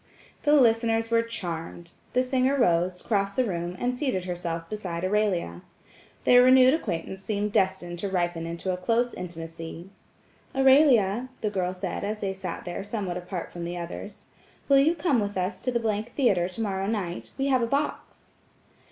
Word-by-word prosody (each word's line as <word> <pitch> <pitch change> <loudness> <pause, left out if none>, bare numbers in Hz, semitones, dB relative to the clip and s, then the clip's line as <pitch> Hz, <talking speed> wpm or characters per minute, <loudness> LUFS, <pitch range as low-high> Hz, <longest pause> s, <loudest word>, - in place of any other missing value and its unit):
The 295 - +5
listeners 230 -3 +3
were 230 0 +4
charmed. 170 -6 -6 0.2
The 255 - +3
singer 260 +2 +1
rose, 180 -5 +2
crossed 200 -3 0
the 255 - +3
room 175 -5 -3
and 250 +4 -1
seated 250 -9 -1
herself 170 -2 -4
beside 185 -4 -4
Aurelia. 185 - 0 0.6
Their 245 0 +7
renewed 255 +1 +7
acquaintance 190 - -3
seemed 205 +1 -2
destined 185 -3 0
to 200 - -2
ripen 175 -3 -1
into 170 +3 -3
a - - -3
close 230 +6 +1
intimacy. 165 0 -8 0.6
"Aurelia," 260 -5 +4
the 210 - -1
girl 185 -2 -1
said 185 +1 -4
as 210 +2 -2
they 195 -2 -2
sat 190 -2 -6
there 175 +2 -4
somewhat 200 -4 -3
apart 180 0 -6
from 175 - -6
the 175 +1 -4
others, 175 +4 -7 0.4
"Will 275 -1 +6
you 315 +5 +4
come 295 -6 +1
with 205 -2 -2
us 185 +3 -2
to 255 - -2
the 220 -3 0
— - - -29
Theatre 190 -10 +2
tomorrow 195 -1 -2
night–we 210 +5 -3
have 260 -2 +3
a 235 - +1
box?" 280 +4 -3
200 Hz, 170 wpm, -26 LUFS, 175-240 Hz, 0.6 s, Their